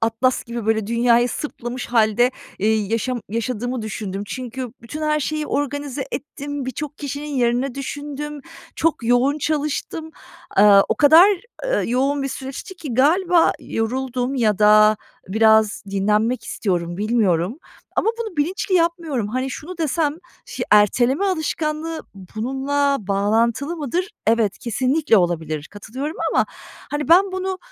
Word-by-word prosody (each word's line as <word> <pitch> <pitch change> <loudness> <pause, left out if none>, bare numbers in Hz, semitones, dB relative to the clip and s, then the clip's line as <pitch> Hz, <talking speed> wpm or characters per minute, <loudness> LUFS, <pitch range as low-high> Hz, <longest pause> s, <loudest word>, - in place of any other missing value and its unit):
Atlas 230 +3 +1
gibi, 235 -2 -5
böyle, 220 -2 +1
dünyayı 235 +1 +3
sırtlamış 245 -4 -5
hâlde, 235 +1 +3 0.3
eee, 220 +2 +2
yaşam 225 +3 -1
yaşadığımı 245 +1 -2
düşündüm. 205 -2 -4
Çünkü 255 0 -6
bütün 300 +7 -7
her 305 0 +1
şeyi 305 +1 -2
organize 285 -1 -2
ettim. 285 0 -5
Birçok 285 +3 -5
kişinin 285 +1 -5
yerine 245 +1 +1
düşündüm. 290 +1 -5 0.4
Çok 320 -7 0
yoğun 245 +5 +3
çalıştım. 305 +2 -2 0.5
Aaa, 200 0 +7
o - - +2
kadar, 320 +6 +7 0.4
ııı, - - 0
yoğun 275 +3 +1
bir 275 - -2
süreçti 270 - -7
ki 290 -8 -6
galiba 340 +6 +4
yoruldum 250 +3 -2
ya 215 -5 +1
da 215 0 +6 0.3
biraz 220 +1 +3
dinlenmek 215 +4 +1
istiyorum, 175 -5 -2
bilmiyorum 210 - +1 0.4
ama 445 - +3
bunu 440 -8 -5
bilinçli 370 +6 -1
yapmıyorum. 330 - 0
Hani, 255 +4 -2
şunu 340 +7 -8
desem, 310 -1 0 0.3
"Ş - - -5
erteleme 240 - +4
alışkanlığı 315 -2 -2 0.3
bununla 275 +4 0
bağlantılı 225 - 0
mıdır?" 340 - -2 0.2
Evet, 225 -3 +2
kesinlikle 255 +3 +1
olabilir. 160 -4 -1
Katılıyorum 260 - -6
ama - - +2 0.4
hani 295 +1 -3
ben 375 +3 +5
bunu: 375 0 -3
255 Hz, 130 wpm, -21 LUFS, 220-300 Hz, 0.5 s, Aaa